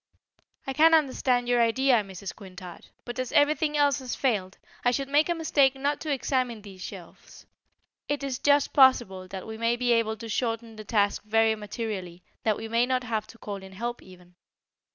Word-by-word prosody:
"I 270 - -3
can 325 +3 +6
understand 255 -4 +1
your 245 -1 +3
idea, 250 +2 +3
Mrs. 195 0 -8
Quintard, 185 -3 -11 0.2
but 240 +1 -6
as 255 -1 -3
everything 300 +1 +3
else 285 -1 +3
has 255 -2 -5
failed, 205 -8 -1 0.3
I 245 - +4
should 270 +2 -1
make 295 +4 +3
a 345 - +1
mistake 285 -5 +2
not 285 +2 -1
to 310 - -3
examine 255 -4 -1
these 190 -3 -12
shelves. 185 -2 -11 0.6
It 290 -1 -2
is 270 -2 -3
just 285 0 +3
possible 240 -9 +4
that 190 0 -7
we 220 0 -8
may 230 +1 +2
be 245 0 0
able 220 -1 +1
to 230 +2 -8
shorten 225 0 -2
the 215 - -8
task 205 -2 +1
very 225 +1 +2
materially; 205 -4 -6 0.2
that 215 -2 +1
we 225 - -6
may 230 +2 +2
not 255 -1 0
have 220 -3 -3
to 230 - -15
call 205 -3 -6
in 190 0 -12
help, 240 +4 -4
even. 180 -1 -17
235 Hz, 195 wpm, -27 LUFS, 210-270 Hz, 0.6 s, can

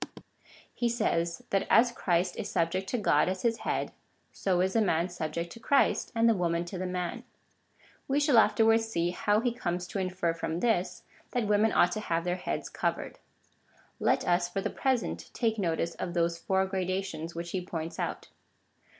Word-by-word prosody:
He 240 - 0
says, 170 -8 0
that 195 - +1
as 235 +1 +5
Christ 180 -5 0
is 210 - -4
subject 185 +3 0
to 245 - 0
God 175 -6 +3
as 185 0 -3
his 230 -1 +2
head, - - -2 0.4
so 185 -2 0
is 190 +1 +1
the 225 - +3
man 175 -3 +1
subject 170 0 -4
to - - -12
Christ, 280 +4 +2
and 230 0 +4
the 230 - +5
woman 170 -3 0
to 180 +1 -6
the 185 - -2
man. 180 +6 -3 0.8
We 275 +1 +2
shall 290 -5 +5
afterwards 225 0 +4
see, 175 -6 -1
how 205 +4 +1
he 245 0 +1
comes 175 -6 -3
to 195 - -3
infer 185 -2 -1
from 165 0 -3
this, 215 -4 0 0.3
that 245 -3 +1
women 210 +1 +3
ought 175 - +4
to 215 - -2
have 165 -5 -1
their 180 +1 -1
heads 180 - -3
covered. - - -3 0.8
Let - - +1
us, 175 0 +2
for 195 - -2
the - - -2
present, 260 -4 -1
take 225 -2 0
notice 170 -2 0
of 175 -1 -5
those 170 0 +1
four 190 +1 +1
gradations 185 -3 -3
which 170 0 -5
he 185 - -1
points 165 -2 -5
out. - - -3
185 Hz, 185 wpm, -29 LUFS, 170-225 Hz, 0.8 s, as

